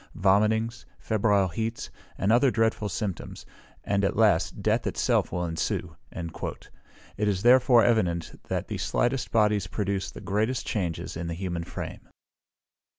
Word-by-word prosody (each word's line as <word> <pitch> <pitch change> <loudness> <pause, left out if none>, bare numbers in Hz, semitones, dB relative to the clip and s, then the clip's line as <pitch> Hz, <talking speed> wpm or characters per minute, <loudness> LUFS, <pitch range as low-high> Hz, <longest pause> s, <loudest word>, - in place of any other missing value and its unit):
vomitings, 110 +5 +2
febrile 100 -3 +2
heats, 115 +6 -4 0.3
and 100 - +1
other 125 +4 +5
dreadful 110 -2 0
symptoms; 100 -7 -5 0.4
and, 100 0 0
at 100 - +1
last, 105 -6 +2
death - - +1
itself - - +1
will 90 0 -1
ensue." 80 0 -3 0.2
It 85 +4 -7
is 100 -2 0
therefore 125 -1 +6
evident 90 -8 0
that - - -2
the - - -4
slightest 125 +1 0
bodies 105 -4 +2
produce 100 -1 -2
the - - -10
greatest 110 +5 -1
changes 90 -6 -3
in 85 +1 -4
the 85 - -3
human 85 -2 -4
frame. - - -7
105 Hz, 140 wpm, -27 LUFS, 90-115 Hz, 0.4 s, therefore